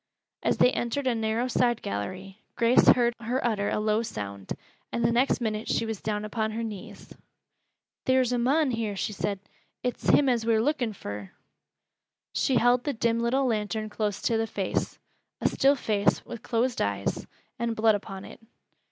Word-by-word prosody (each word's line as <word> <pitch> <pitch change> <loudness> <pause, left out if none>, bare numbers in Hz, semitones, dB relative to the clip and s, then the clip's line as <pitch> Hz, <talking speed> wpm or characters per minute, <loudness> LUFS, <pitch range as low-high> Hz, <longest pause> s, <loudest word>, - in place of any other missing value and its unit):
As - - +1
they 250 - +5
entered 245 +4 -2
a 255 - +3
narrow 225 +2 0
side 240 -1 +1
gallery, 185 - -5 0.2
Grace 235 +1 +4
heard 240 -1 +6
her 240 +3 -1
utter 210 -4 +1
a - - 0
low 215 +1 +2
sound, 100 - -5 0.4
and 235 - 0
the 230 - +4
next 245 +3 +2
minute 220 -2 -2
she - - +1
was 225 -3 -4
down 210 -1 -2
upon 220 0 -2
her 230 +1 -3
knees. 210 -4 -8 0.9
"Theer's 260 -1 +3
a 245 - +1
mon 275 +4 +2
here," 225 -3 -2
she 210 - -2
said. 200 0 -2 0.4
"It's 250 - -2
him 285 - +5
as 240 -3 +2
we're 225 -1 +3
lookin' 245 -3 0
fur." 100 - -7 1.0
She 265 - +1
held 245 +1 +4
the 290 - -1
dim 230 0 +1
little 255 +4 +1
lantern 215 -2 -1
close 210 -2 -2
to 230 -2 +2
the 225 - 0
face, 195 -3 -2 0.4
a - - +2
still 275 +1 +3
face 210 -5 +1
with 235 -2 -8
closed 240 +1 0
eyes, 100 -1 -1 0.3
and 230 -1 -1
blood 220 0 +4
upon 195 -1 -5
it. - - -11
225 Hz, 180 wpm, -27 LUFS, 210-245 Hz, 1.0 s, heard